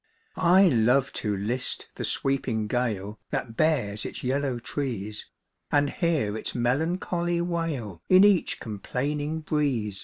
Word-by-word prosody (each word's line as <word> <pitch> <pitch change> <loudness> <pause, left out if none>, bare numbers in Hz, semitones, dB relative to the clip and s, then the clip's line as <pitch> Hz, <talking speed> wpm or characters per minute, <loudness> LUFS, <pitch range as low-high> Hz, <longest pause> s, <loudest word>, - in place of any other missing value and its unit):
I 185 +2 +5
love 125 0 +3
to 105 -2 -1
list 120 +6 -2
the - - -6
sweeping 130 -5 0
gale 105 -3 -2
That 115 -2 -3
bares 115 -10 +1
its - - -6
yellow 135 0 0
trees, 115 -5 -4 0.4
And 145 -1 +3
hear 155 - 0
its 110 - -4
melancholy 170 +7 0
wail 165 - -3
In 185 +1 +8
each 205 -4 +3
complaining 145 +9 -3
breeze. 135 - -1
135 Hz, 125 wpm, -26 LUFS, 110-160 Hz, 0.4 s, In